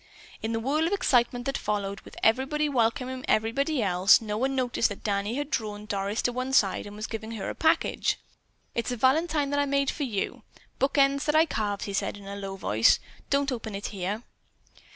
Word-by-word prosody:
In 220 - -2
the 225 - 0
whirl 295 +7 +1
of 375 - -1
excitement 245 -9 +2
that 275 - -1
followed, 200 -1 -2
with - - -14
everybody 270 +6 +2
welcoming 255 0 0
everybody 255 +5 +1
else, 185 0 +5
no 210 -2 -4
one 265 +5 0
noticed 250 -3 +1
that 205 - -8
Danny 205 +2 -1
had 290 +2 -3
drawn 210 -5 -3
Doris 200 +1 -2
to 245 - +2
one 255 +2 -3
side 205 -5 +3
and 205 - -9
was 215 +1 -4
giving 225 0 -6
her 215 - -4
a - - -6
package. 320 - +1 0.6
"It's 235 +1 -2
a 245 - -2
valentine 290 +3 +2
that 285 - +1
I 285 - +2
made 280 -1 +1
for - - -8
you. 225 -8 -2 0.4
Book 275 +2 +1
ends 275 0 +3
that 300 - +1
I 315 +1 +6
carved," 205 -8 -2
he 200 - -4
said 200 - -1
in 200 - -12
a 200 0 -6
low 195 -1 -5
voice. 110 - +4 0.3
"Don't 280 0 +2
open 225 -4 -4
it 200 - -4
here." 200 +3 -3
235 Hz, 210 wpm, -27 LUFS, 205-275 Hz, 0.6 s, I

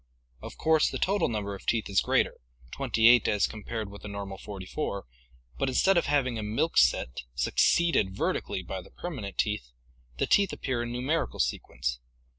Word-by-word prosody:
Of - - -9
course 160 -1 +3
the - - -4
total 200 +2 +1
number 105 -3 -3
of 100 - -10
teeth 115 -2 +1
is 100 -1 +3
greater, - - +1 0.3
twenty 115 0 +2
eight 120 0 +6
as 105 -3 +3
compared 110 -1 -5
with 100 - -11
the - - -8
normal 100 -1 -6
forty 95 -3 -8
four, 100 -4 -3 0.5
but 135 - +1
instead 190 +9 +3
of 170 - +2
having 130 -5 +1
a - - -3
milk 115 +11 -1
set, 65 -1 +2
succeeded 95 - +2
vertically 95 - -1
by 95 +2 -5
the - - -15
permanent 120 - -6
teeth, 105 - -1 0.5
the - - +1
teeth 200 -2 +3
appear 130 -3 -2
in 120 0 -4
numerical 130 +7 -1
sequence. 65 0 -2
110 Hz, 180 wpm, -28 LUFS, 95-135 Hz, 0.5 s, eight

